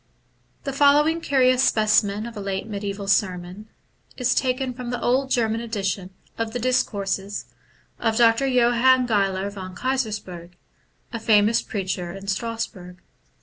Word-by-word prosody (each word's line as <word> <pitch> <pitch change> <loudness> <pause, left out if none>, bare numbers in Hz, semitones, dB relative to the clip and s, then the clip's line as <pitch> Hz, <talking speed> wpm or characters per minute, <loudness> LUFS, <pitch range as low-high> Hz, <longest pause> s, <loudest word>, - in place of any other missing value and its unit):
The 275 - -4
following 295 +4 +4
curious 255 -3 +3
specimen 210 -2 +2
of 235 -1 -8
a - - -6
late 195 +1 -3
mediaBval 200 -1 -5
sermon 185 +1 -1 0.5
is 250 -1 +1
taken 255 0 0
from 245 -1 -7
the 245 0 -3
old 260 +3 +1
German 225 -3 +1
edition 195 -5 -3 0.3
of 225 -1 -2
the 245 - -2
discourses 205 -5 -1 0.5
of 225 -1 0
Dr. 235 +3 +4
Johann 250 0 +4
Geiler 200 -3 0
von 185 -2 -8
Keysersperg, 210 -9 -3 0.6
a 230 - -3
famous 220 0 +3
preacher 185 -3 -4
in 195 0 -9
Strasbourg. 200 -3 -4
220 Hz, 135 wpm, -23 LUFS, 195-250 Hz, 0.6 s, following